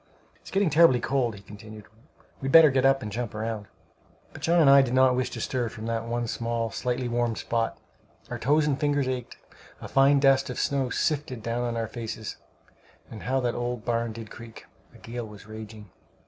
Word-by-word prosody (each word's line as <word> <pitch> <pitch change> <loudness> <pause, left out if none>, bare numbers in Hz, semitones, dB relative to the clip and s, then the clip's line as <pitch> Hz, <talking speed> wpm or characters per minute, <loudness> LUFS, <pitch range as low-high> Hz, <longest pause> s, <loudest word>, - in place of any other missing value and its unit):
"It's - - -14
getting 195 -4 +1
terribly 150 -5 +6
cold," 120 -1 0
he 100 - -12
continued; 105 +1 -12 0.6
"we'd 135 0 -2
better 160 -2 +8
get 130 0 +3
up 135 -1 +2
and 105 - -5
jump 120 +1 -4
round." 110 -1 -4 0.7
But - - -11
John 170 +1 +3
and 155 - +5
I 140 0 +8
did 130 -1 -1
not 130 -1 +5
wish 130 0 -1
to - - -7
stir 125 -3 -2
from 110 0 -8
that 115 0 -2
one 120 0 -2
small 115 0 -2
slightly 125 0 -2
warmed 120 -1 -1
spot. 115 -1 -2 0.5
Our - - -6
toes 150 +3 +2
and 140 -3 0
fingers 145 -3 +1
ached. 125 -2 -4 0.4
A - - -8
fine 140 +1 +4
dust 135 -1 +3
of 125 - -5
snow 135 -2 0
sifted 140 -6 -2
down 115 +1 -2
on 120 -1 -2
our 115 -1 -2
faces; 110 -2 -6 0.7
and 110 - -8
how 130 +1 0
that 120 -1 0
old 120 -2 -4
barn 115 -1 -1
did 110 -1 -9
creak! 115 -1 -11 0.3
A - - -17
gale 115 0 -7
was 105 -1 -13
raging. 110 -2 -10
120 Hz, 205 wpm, -26 LUFS, 115-135 Hz, 0.7 s, better